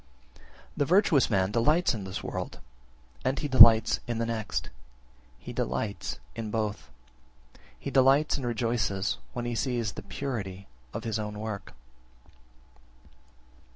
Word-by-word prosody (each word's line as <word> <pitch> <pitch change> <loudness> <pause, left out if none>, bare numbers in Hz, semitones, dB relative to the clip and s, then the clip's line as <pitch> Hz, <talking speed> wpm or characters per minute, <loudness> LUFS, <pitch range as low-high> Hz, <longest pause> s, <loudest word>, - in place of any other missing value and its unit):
16. - - -23 0.3
The 145 - +2
virtuous 175 -4 +4
man 95 -3 +1
delights 150 +9 +3
in 105 -4 -5
this 95 0 -6
world, - - -5 0.6
and 130 +2 0
he 150 - -2
delights 115 -4 +8
in 120 -1 -2
the 115 - 0
next; 115 -2 -3 0.7
he - - -9
delights 75 - -3 0.2
in 110 -1 -4
both. 105 -1 -3 0.9
He - - -6
delights 135 +3 +4
and 130 - -3
rejoices, 115 -4 -1
when 120 -1 -4
he 120 - -2
sees 120 -3 -1
the - - -8
purity 100 -8 -5 0.3
of - - -6
his 110 -1 -2
own 105 -1 -5
work. 105 -8 -6
115 Hz, 135 wpm, -28 LUFS, 105-130 Hz, 0.9 s, delights